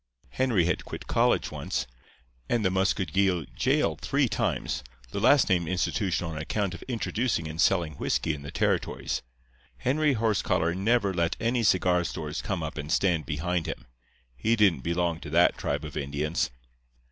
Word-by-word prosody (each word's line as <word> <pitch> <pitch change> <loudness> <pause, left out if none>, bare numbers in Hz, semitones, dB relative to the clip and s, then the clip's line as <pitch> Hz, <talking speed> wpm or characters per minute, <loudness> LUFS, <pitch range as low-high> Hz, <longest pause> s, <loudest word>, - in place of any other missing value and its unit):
Henry 105 - +2
had 90 - 0
quit - - -8
college - - +2
once, - - -3 0.6
and 115 -3 +1
the 95 - +3
Muscogee 95 -2 +1
jail - - +2
three - - +2
times—the - - -3
last 145 -2 +5
named 90 -4 +2
institution 90 0 0
on 80 -1 -4
account 95 +4 -1
of 90 - -8
introducing 115 -6 -1
and 80 +2 -3
selling 85 -5 +2
whisky 80 - 0
in 75 - -7
the 70 - -8
territories. - - -1 0.6
Henry 145 +3 +2
Horsecollar 105 -7 +1
never 100 +1 +1
let 85 -1 0
any 120 +1 +1
cigar 90 -4 +3
stores 75 -2 -4
come 95 -5 -3
up 80 0 -5
and 75 +1 -5
stand 85 -4 +2
behind 85 +3 -1
him. - - -5 0.5
He 110 - +1
didn't 100 - +4
belong 85 +3 -1
to 80 - -8
that 85 +3 +4
tribe - - -2
of - - -8
Indians. 75 +3 -1
90 Hz, 160 wpm, -27 LUFS, 80-100 Hz, 0.6 s, last